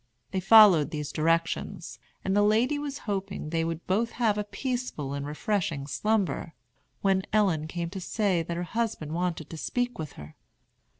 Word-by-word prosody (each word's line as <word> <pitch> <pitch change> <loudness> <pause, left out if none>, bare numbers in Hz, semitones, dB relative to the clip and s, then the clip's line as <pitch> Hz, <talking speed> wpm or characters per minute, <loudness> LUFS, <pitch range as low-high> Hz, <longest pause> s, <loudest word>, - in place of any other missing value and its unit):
They 190 - 0
followed 195 -6 +7
these 150 -2 -4
directions, 165 +2 -1 0.3
and 190 0 +1
the 205 - +5
lady 230 +8 +3
was 285 -1 -4
hoping 195 -6 -3
they 165 -1 +1
would 165 0 -4
both 220 +5 0
have 210 -3 +1
peaceful 245 - -3
and 140 0 -4
refreshing 155 -2 -1
slumber, 200 +1 -1 0.5
when 195 -1 +3
Ellen 185 -8 +2
came 170 0 -4
to 190 -1 -6
say 195 -3 +1
that 170 +1 -4
her 175 - -2
husband 180 -6 -2
wanted 170 -3 -2
to 165 - -6
speak 245 +6 -2
with 155 -3 -5
her. 75 +1 -11
185 Hz, 165 wpm, -28 LUFS, 160-215 Hz, 0.5 s, followed